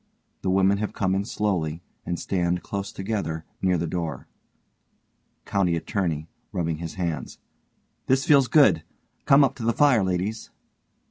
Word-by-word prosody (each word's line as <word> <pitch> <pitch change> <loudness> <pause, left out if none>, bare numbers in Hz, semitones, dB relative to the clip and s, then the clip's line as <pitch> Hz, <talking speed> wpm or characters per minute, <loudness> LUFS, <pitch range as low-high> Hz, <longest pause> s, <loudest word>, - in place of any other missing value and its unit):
The 95 - -1
women 95 +1 +3
have 105 - -3
come 95 -2 0
in 100 +1 0
slowly, 90 -7 -2 0.2
and 85 0 -2
stand 90 -2 -1
close 100 0 -4
together 95 -6 -3 0.2
near 90 -1 +2
the 85 - -1
door_. 80 -5 -4 1.2
COUNTY 90 -4 +1
ATTORNEY: 85 -3 -2 0.2
(rubbing 85 -3 -1
his 85 -1 -6
hands) 85 -7 -3 0.7
This 130 +1 +2
feels 140 -4 +5
good. 110 - +5 0.4
Come 140 +1 +6
up 135 - +2
to 120 - -6
the 115 +1 +2
fire, 135 -7 +4
ladies. 95 +4 -2
95 Hz, 145 wpm, -25 LUFS, 85-105 Hz, 1.2 s, Come